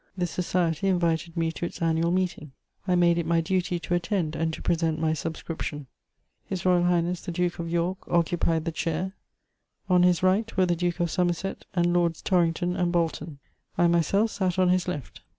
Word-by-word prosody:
This 175 -2 -1
society 175 0 0
invited 170 -2 0
me 165 -1 +1
to 165 - -8
its - - -10
annual 165 0 +1
meeting; 175 -6 -2 0.3
I 180 - +3
made 170 -1 +4
it 170 - -2
my 170 0 +3
duty 180 +1 0
to 175 - -3
attend 175 -2 -1
and 160 +1 0
to - - -7
present 165 -2 0
my 160 0 +1
subscription. 160 -2 -5 0.6
H.R.H. 180 -1 +1
the 180 - -5
Duke 175 0 -1
of 170 0 -3
York 175 +3 -1
occupied 165 -1 +1
the 165 - -1
chair; 165 +4 -2 0.7
on 180 -1 +4
his 180 0 +3
right 200 +4 +1
were 185 - +4
the 175 -1 +1
Duke 175 0 -1
of 170 -2 0
Somerset 180 +1 -1
and 175 -1 +2
Lords 170 -2 +1
Torrington 175 0 +1
and 175 -1 0
Bolton; 165 -3 -1 0.4
I 175 - +4
myself 170 +6 +2
sat 185 -2 -1
on 185 -1 +4
his 180 0 +2
left. 150 -7 -5
175 Hz, 185 wpm, -26 LUFS, 165-180 Hz, 0.7 s, made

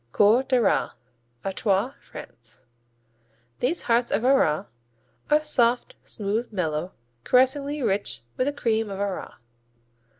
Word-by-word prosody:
Coeurs 220 - +4
d'Arras 250 -3 +2 0.5
Artois, 195 +5 0
France - - -10 1.0
These 315 +8 0
hearts 235 0 +2
of 220 +4 +1
Arras 255 - +3 0.6
are 300 0 +4
soft, 250 - +2
smooth, 215 +3 -2
mellow, 170 -3 -2 0.3
caressingly 275 - +2
rich 195 - -1
with 255 - 0
the 290 - 0
cream 225 -5 0
of 195 -1 -5
Arras. 200 -2 -3
230 Hz, 110 wpm, -25 LUFS, 195-265 Hz, 1.0 s, Coeurs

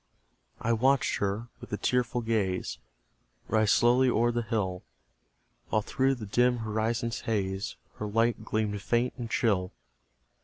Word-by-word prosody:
I 115 - +1
watched 130 +4 +2
her, 105 +4 -2
with - - -11
a 105 - -1
tearful 125 0 0
gaze, 100 - -1 0.7
Rise 110 -2 +3
slowly 125 +2 +4
o'er 120 0 +2
the 120 0 -1
hill, 100 -5 -2 0.9
While 110 - +1
through 135 +4 +1
the 115 -4 -7
dim 120 +4 +2
horizon's 110 +1 -1
haze 95 -3 -2 0.2
Her 105 - -3
light 115 +3 +1
gleamed 105 -2 -1
faint 120 +5 +1
and 120 -2 -5
chill. 95 -7 +1
115 Hz, 140 wpm, -29 LUFS, 105-120 Hz, 0.9 s, slowly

